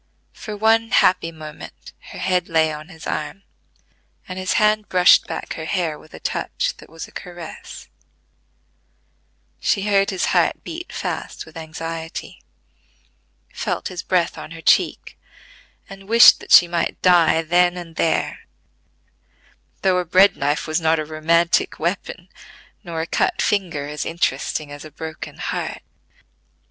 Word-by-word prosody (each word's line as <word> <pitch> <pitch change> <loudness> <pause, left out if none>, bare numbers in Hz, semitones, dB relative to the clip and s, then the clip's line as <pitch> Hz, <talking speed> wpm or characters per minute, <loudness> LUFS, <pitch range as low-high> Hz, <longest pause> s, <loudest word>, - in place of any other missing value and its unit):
For 215 -2 -7
one 225 +1 +3
happy 180 -7 +3
moment 155 -2 -11 0.2
her - - -9
head 180 -2 0
lay 160 -1 +2
on 150 +1 -8
his 160 -3 -12
arm, 155 +6 -4 0.8
and 185 -1 -6
his 185 - -1
hand 215 0 +2
brushed 180 -1 +5
back - - -5
her 160 - -6
hair 165 -3 -2
with 155 - -15
a - - -10
touch - - -2
that - - -15
was 165 0 -8
a - - -18
caress: 175 -2 -9 1.7
she 195 - 0
heard 200 -1 +2
his 190 -2 -1
heart - - +2
beat 345 +2 -7
fast - - -5
with 160 - -16
anxiety; 165 0 -7 1.1
felt - - -3
his 180 -2 -5
breath 175 -2 0
on - - -8
her 165 0 -10
cheek, - - +1 0.7
and 195 +1 -12
wished 230 +1 +8
that - - -12
she 175 - +9
might 170 0 -2
die 170 -2 +4
then 175 +2 +2
and 170 -2 -9
there, 160 - 0 1.4
though 185 -1 +3
a - - -1
bread 185 +3 +5
knife 145 +2 -1
was 155 +1 -1
not 160 0 +3
a 155 - -2
romantic 165 +2 +1
weapon, 175 +1 -3 0.6
nor 165 -3 -4
a - - -2
cut - - 0
finger 170 -8 0
as 150 +1 -4
interesting 150 -2 -2
as 145 0 -9
a 155 - -10
broken 160 +1 -8
heart. - - -4
170 Hz, 150 wpm, -21 LUFS, 160-185 Hz, 1.7 s, she